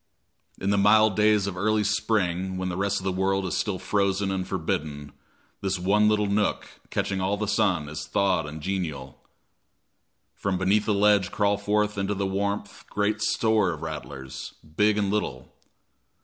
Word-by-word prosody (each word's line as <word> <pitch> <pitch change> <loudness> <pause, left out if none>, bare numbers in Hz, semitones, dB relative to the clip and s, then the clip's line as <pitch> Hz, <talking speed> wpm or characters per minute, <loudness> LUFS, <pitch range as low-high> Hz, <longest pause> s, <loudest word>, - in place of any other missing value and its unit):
In 100 - 0
the 100 - +2
mild 105 0 +5
days 105 -1 +3
of 100 -2 -3
early 105 +3 +1
spring, 95 -3 0
when 95 0 -2
the 90 - -3
rest 100 +1 0
of - - -10
the 95 - 0
world 95 +1 0
is 90 - -2
still 100 -3 -1
frozen 100 0 0
and 95 -1 -2
forbidden, 75 -5 -3 0.5
this 95 -1 -1
one 105 +4 +3
little 105 -1 +2
nook, 105 +1 0 0.2
catching 95 -1 -1
all 95 +2 0
the 105 0 -2
sun, 95 -7 +1
is 75 0 -6
thawed 95 -6 +1
and 75 +1 -8
genial. 75 -8 -4 1.1
From 100 -2 -2
beneath 100 +3 +2
the 105 - +3
ledge 100 -2 +3
crawl 100 -1 +1
forth 105 0 0
into 100 +1 -1
the 100 0 -1
warmth 100 +1 -3
great 105 +1 0
store 110 -5 +2
of 80 0 -8
rattlers, 70 -4 -7 0.2
big 105 +2 +3
and 100 -2 +1
little. 65 -12 -3
100 Hz, 170 wpm, -26 LUFS, 90-105 Hz, 1.1 s, mild